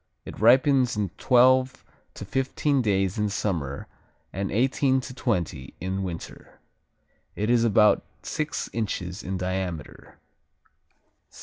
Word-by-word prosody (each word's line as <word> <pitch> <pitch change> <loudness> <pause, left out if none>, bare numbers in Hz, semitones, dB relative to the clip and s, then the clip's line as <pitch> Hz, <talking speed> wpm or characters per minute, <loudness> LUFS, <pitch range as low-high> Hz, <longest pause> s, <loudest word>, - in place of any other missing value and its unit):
It - - -9
ripens 125 +1 +4
in 100 -2 -1
twelve 130 +1 +3 0.3
to - - -7
fifteen 135 +4 0
days 95 -3 0
in 105 0 +1
summer, 85 -9 -3 0.5
and 100 +1 -3
eighteen 130 +4 +2
to 130 - -8
twenty 85 - -3
in 95 +2 -3
winter. 90 -3 -8 0.8
It 105 +3 0
is 120 -1 +4
about 110 -2 +4 0.2
six 155 +1 -3
inches 100 -4 -3
in 95 -2 -4
diameter. 90 -3 -5
105 Hz, 115 wpm, -25 LUFS, 95-130 Hz, 0.8 s, ripens